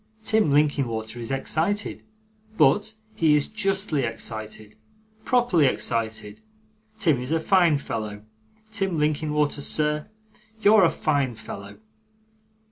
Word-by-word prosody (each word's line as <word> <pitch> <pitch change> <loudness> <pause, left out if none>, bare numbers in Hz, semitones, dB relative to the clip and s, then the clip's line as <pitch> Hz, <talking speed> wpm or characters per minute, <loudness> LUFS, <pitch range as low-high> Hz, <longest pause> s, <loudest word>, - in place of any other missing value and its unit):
Tim 220 -6 +2
Linkinwater 130 -6 0
is 115 - -5
excited, 160 +9 -1 0.6
but 215 +1 +3 0.2
he 160 -5 +3
is 145 - +1
justly 195 -7 -1
excited, 110 -2 -5 0.5
properly 240 - +3
excited. 110 - -2 0.6
Tim 155 - +1
is 125 +4 -5
a 165 - +2
fine 170 -2 +3
fellow. 105 -6 -5 0.5
Tim 195 -5 -1
Linkinwater, 150 -1 0
sir 150 +1 0 0.5
you're 215 -1 +6
a 170 - +5
fine 140 -7 -1
fellow. 100 -2 -9
150 Hz, 110 wpm, -24 LUFS, 115-175 Hz, 0.6 s, you're